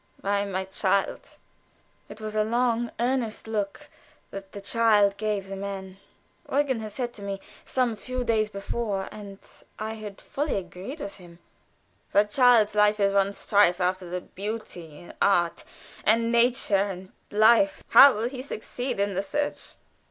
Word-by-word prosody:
"Why, 200 0 0
my 190 -1 -3
child?" 190 0 -1 0.7
It 210 - -10
was 215 -1 -5
a 215 0 +2
long 235 +1 0
earnest 240 -2 -1
look 205 -3 -3 0.4
that 195 -1 -8
the 200 - -8
child 205 -1 +3
gave 210 -2 -2
the 195 - -6
man. 195 -1 -6 0.5
Eugen 275 -4 +1
had 215 -1 -6
said 240 +2 -4
to 205 - -12
me 200 -1 -4 0.3
some 250 -3 0
few 255 +3 -4
days 220 -2 +1
before, 200 -1 -3
and 200 -2 -9 0.4
I 220 +1 -4
had 215 -2 -9
fully 290 +2 -3
agreed 195 - -6
with 200 - -6
him: 175 -3 -15 0.8
"That 205 +1 +3
child's 245 -5 +5
life 210 0 +3
is 200 -1 +2
one 200 0 +3
strife 200 -3 +3
after 180 0 -1
the 180 +1 -3
beautiful 210 -1 -6
in 160 +1 -13
art, 175 -4 +2 0.4
and 230 +2 +3
nature, 235 -3 +3
and 185 0 -8 0.2
life 230 +8 +4
how 280 -1 +9
will 220 +3 -1
he 255 0 -6
succeed 250 -2 -5
in 200 0 0
the 190 - 0
search?" 290 +9 -3
210 Hz, 160 wpm, -26 LUFS, 195-235 Hz, 0.8 s, how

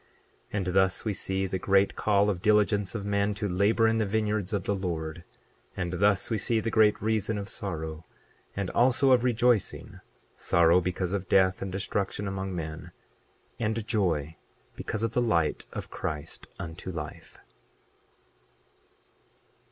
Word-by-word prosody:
28:14 - - -2
And 95 - -1
thus 95 +3 +2
we 105 - 0
see 95 0 -1
the 95 0 -3
great 100 +1 +3
call 100 -1 +2
of 90 -3 -5
diligence 105 -2 +2
of 100 -3 -4
men 100 0 0
to 105 +1 -2
labor 100 +5 +3
in 115 0 +2
the 110 - +1
vineyards 105 -2 -1
of 100 -3 -1
the 100 - 0
Lord; 85 -3 -4 0.5
and 90 0 -2
thus 100 +3 +2
we 110 - +1
see 115 +2 +1
the 115 +1 -2
great 105 -1 +4
reason 110 -1 0
of 100 -1 -5
sorrow, 80 -6 -4 0.5
and 100 -2 -2
also 130 +2 +4
of 125 -1 +5
rejoicing—sorrow 110 -7 +1
because 90 +1 -2
of 95 -2 -3
death 95 -1 +3
and 95 - -4
destruction 100 +1 -2
among 95 -1 -4
men, 80 -2 -6 0.7
and 110 -1 -1
joy 80 -9 0 0.4
because 110 0 -4
of 115 - 0
the 125 - +2
light 85 -10 0
of - - -7
Christ 75 +1 -5
unto 80 +2 -7
life. 80 -4 -7
100 Hz, 150 wpm, -28 LUFS, 90-110 Hz, 0.7 s, of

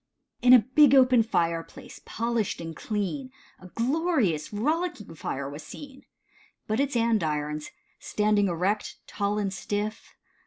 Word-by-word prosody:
IN 250 0 +5
a - - +11 0.2
big 290 -2 +7
open 255 -2 +6
fireplace, 170 +4 -3
polished 230 -2 -2
and 165 -1 -6
clean, 215 +6 -3 0.3
A 185 - -12
glorious, 240 - 0
rollicking 300 - -2
fire 140 -3 -4
was 145 +2 -8
seen, 275 - -11 0.6
But 215 +3 -1
its 280 -1 0
Andirons, 155 -10 0 0.3
standing 210 -1 +1
erect, 185 +4 -1
tall 205 0 -2
and 200 -2 -1
stiff. 205 +3 -4
210 Hz, 125 wpm, -27 LUFS, 180-255 Hz, 0.6 s, a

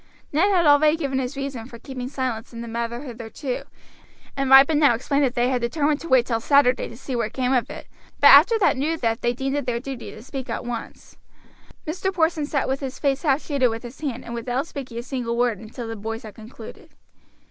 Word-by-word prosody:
Ned 340 +8 +3
had 360 -4 +3
already 300 +2 +5
given 275 -4 -1
his 265 +2 -4
reason 270 -4 -5
for 235 - -11
keeping 255 +1 -7
silence 255 -4 -3
in 230 - -7
the 235 - -7
matter 235 +2 -4
hitherto, 245 +1 -6 0.7
and 275 -1 -1
Ripon 275 +3 +7
now 285 -6 +5
explained 280 +4 0
that 250 - -2
they 245 0 +2
had 255 -2 0
determined 290 +4 0
to 335 - -8
wait 260 -5 +4
till 230 -3 -1
Saturday 260 0 +3
to 230 - -11
see 260 0 -5
what 230 -2 -2
came 255 0 0
of 250 -2 +1
it, - - -8 0.3
but - - -30
that - - +11
after 460 - +1
that 370 -9 +2
new 310 +5 0
theft 230 -4 -1
they 240 - +1
deemed 270 +3 -2
it 285 -3 -3
their 235 -1 0
duty 265 -1 -7
to 215 - -11
speak 265 0 -7
at - - -4
once. 240 -2 -7 0.7
Mr. 365 +5 -2
Porson 320 -4 0
sat 285 -3 -1
with 265 +1 -1
his 270 -2 -5
face 275 -2 0
half 285 -2 +1
shaded 280 -4 +1
with 225 0 -4
his 240 +4 -10
hand 270 -6 -4
and 235 - -7
without 245 +4 -2
speaking 260 -7 -8
a 235 - -4
single 245 -3 -3
word 240 -5 +1
until 230 +2 -8
the 225 - -5
boys 225 +2 -5
had 215 -2 -9
concluded. 225 0 -12
260 Hz, 235 wpm, -23 LUFS, 235-285 Hz, 0.7 s, that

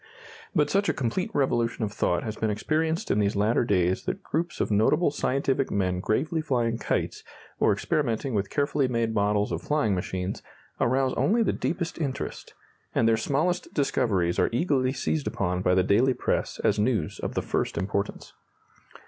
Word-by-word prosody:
But 150 -3 +2
such 200 +1 +2
a - - 0
complete 135 - -1
revolution 120 - 0
of 105 - -1
thought 90 -5 0
has 110 -1 -4
been 110 - -1
experienced 160 +10 -1
in 105 - +2
these 100 -1 +1
latter 105 +4 +2
days 95 -4 +1
that - - -3
groups 170 +3 -2
of - - 0
notable 145 +11 +3
scientific 135 -1 0
men 90 -2 0
gravely 155 - 0
flying 120 -6 0
kites, - - -2 0.4
or - - +4
experimenting 130 -3 -1
with 100 -2 0
carefully 145 -1 +1
made 115 -2 0
models 105 0 +1
of - - -2
flying 145 -9 +1
machines, 90 +1 -3 0.4
arouse 130 +2 +2
only 230 +3 +3
the 210 - +1
deepest 170 -1 -3
interest, 135 -4 -4 0.4
and 115 - +3
their 115 - +5
smallest 155 +10 -1
discoveries 105 - +1
are - - +3
eagerly 130 -1 +1
seized 140 +2 -2
upon 90 -1 -1
by 90 0 +3
the 95 - +4
daily 120 +7 +3
press - - -1
as - - +2
news 105 -7 0
of - - -4
the - - 0
first - - -2
importance. 100 +1 -3
115 Hz, 175 wpm, -26 LUFS, 100-145 Hz, 0.4 s, their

